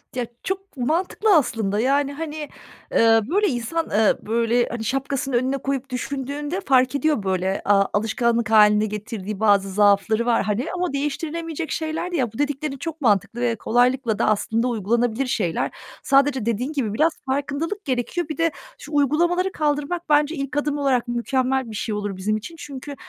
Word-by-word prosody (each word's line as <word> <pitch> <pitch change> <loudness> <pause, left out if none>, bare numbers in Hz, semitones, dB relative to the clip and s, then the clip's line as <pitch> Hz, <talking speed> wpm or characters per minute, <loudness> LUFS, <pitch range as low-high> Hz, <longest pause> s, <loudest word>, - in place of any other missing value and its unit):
Ya, 245 -2 -2 0.2
çok 385 -4 -5
mantıklı 355 - +1
aslında. 220 -8 +1
Yani, 280 +3 +1
hani, 300 0 -5 0.5
ııı, 225 -1 +4
böyle 410 +4 +2
insan, 260 +5 -1
ııı, 215 0 +3
böyle, 235 +2 +1
hani, 235 -2 -4
şapkasını 270 +2 -2
önüne 260 +3 +1
koyup 275 0 -3
düşündüğünde 285 +6 -4
fark 260 -3 +3
ediyor 285 -6 +1
böyle, 190 0 -1
aaa, 195 -1 +4
alışkanlık 230 +2 +1
hâline 210 -1 +6
getirdiği 210 -1 -5
bazı 200 -2 +3
zaafları 205 +3 +3
var, 235 -3 +2
hani, 215 +5 -1
ama 360 -5 -2
değiştirilemeyecek 320 +3 -3
şeyler 320 +2 -3
de - - -2
ya 240 -5 -1
Bu - - -10
dediklerin 290 0 -2
çok 325 +2 -6
mantıklı 230 0 +1
ve 235 -2 +1
kolaylıkla 245 0 +1
da - - +2
aslında 225 +3 +1
uygulanabilir 235 +3 0
şeyler. 180 -9 -1 0.3
Sadece 275 -3 +3
dediğin 240 +6 -1
gibi 230 -8 -1
biraz 310 +7 +3
farkındalık 285 +9 -2
gerekiyor. 280 +6 -2
Bir 310 - -4
de 330 0 +2 0.3
şu 295 - -10
uygulamaları 345 +6 +2
kaldırmak 305 +2 -2
bence 295 +2 +3
ilk 275 0 -4
adım 290 0 0
olarak 265 -4 +1
mükemmel 255 +1 0
bir - - -7
şey 210 +1 -2
olur 205 -1 -3
bizim 215 +3 0
için. 330 +10 -9
Çünkü, 285 -2 -8
260 Hz, 165 wpm, -22 LUFS, 225-295 Hz, 0.5 s, hâline